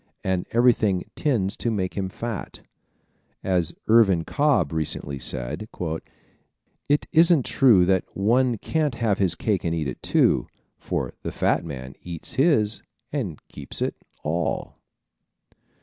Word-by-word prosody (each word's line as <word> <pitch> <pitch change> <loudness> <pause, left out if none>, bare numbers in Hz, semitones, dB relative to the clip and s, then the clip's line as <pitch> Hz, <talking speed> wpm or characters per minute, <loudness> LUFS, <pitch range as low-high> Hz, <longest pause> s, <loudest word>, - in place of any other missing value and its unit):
And 95 -1 -1
everything 110 -6 +3
tends 110 -9 0
to 120 - -1
make 95 -5 -1
him 95 -2 -2
fat. 115 +1 -6 0.8
As 90 -4 0
Irvin 105 -7 +5
Cobb 140 - +1
recently 70 -3 -3
said: 65 - -4 1.2
"It 145 +1 +2
isn't 165 -4 +5
true 115 -10 +5
that 95 0 +2
one 120 +4 +2
can't 150 +3 -1
have 110 -4 0
his 90 -4 +3
cake 100 +2 -1
and 85 -1 0
eat 80 -3 -2
it, 65 - -6
too, - - +2 0.3
for - - -3
the - - -4
fat - - +1
man 65 -5 -7
eats 85 -2 -3
his 115 - +2 0.3
and 105 - -2
keeps - - -7
it - - 0 0.3
all." 85 +3 -2
100 Hz, 135 wpm, -24 LUFS, 85-120 Hz, 1.2 s, Irvin